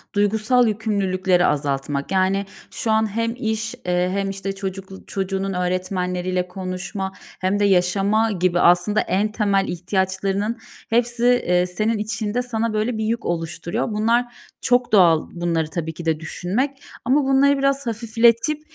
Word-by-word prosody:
duygusal 220 +4 +3
yükümlülükleri 190 -4 +1
azaltmak. 140 0 -1
Yani 190 +1 +1 0.3
şu 225 - -2
an 220 0 +2
hem 230 0 0
iş, 220 -2 -2
eee, 180 0 +1
hem, 195 +1 -1
işte, 195 0 -4
çocuklu 195 0 -7
çocuğunun 195 0 -2
öğretmenleriyle 180 0 -1
konuşma 190 +1 -5 0.3
hem 190 +2 0
de 205 - +3
yaşama 200 +4 +2
gibi 180 -2 +1
aslında 175 +4 +4
en 210 +3 0
temel 200 -3 +1
ihtiyaçlarının 190 +4 -1 0.3
hepsi, 235 +1 +1
eee, 180 -8 +3
senin 215 +5 -1
içinde 215 +2 -2
sana 230 -2 -2
böyle 215 +2 -1
bir 220 - -2
yük 230 +2 -2
oluşturuyor. 170 0 -2
Bunlar 230 +3 +2 0.4
çok 245 -1 +2
doğal 170 -6 +5
bunları 165 -2 -1
tabii 160 -1 -4
ki 170 +1 -9
de 160 -1 +1
düşünmek 240 - -3 0.2
ama 280 +3 +3
bunları 275 +1 +4
biraz 275 -1 0
hafifletip, 230 +6 +2
195 Hz, 140 wpm, -22 LUFS, 180-225 Hz, 0.4 s, doğal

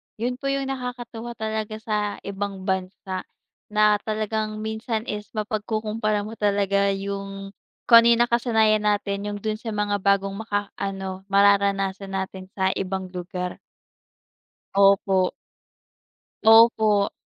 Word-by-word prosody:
Yun 250 +3 -3
po 275 - -4
yung 275 0 -1
nakakatuwa 240 -2 -6
talaga 220 0 -3
sa 210 -2 -1
ibang 200 -1 -5
bansa, 190 0 -3 0.4
na 210 0 +3
talagang 215 0 -2
minsan 220 +1 -3
is 210 -1 -5
mapagkukompara 215 0 -1
mo 220 +2 -8
talaga 200 -1 +2
yung 195 0 -5 0.4
kung 230 0 +10
ano - - +4
yung 235 - +4
nakasanayan 220 -3 +2
natin, 205 0 0
yung 205 0 -3
dun 215 0 -2
sa 235 - -11
mga 205 -1 0
bagong 195 0 +2
makaano, 195 -2 -4
mararanasan 195 -1 +2
natin 190 0 -4
sa 190 -1 +1
ibang 190 -1 -4
lugar. 180 0 -5 1.2
Opo. 195 -1 +4 1.1
Opo. 220 -2 +6
205 Hz, 120 wpm, -24 LUFS, 195-220 Hz, 1.2 s, kung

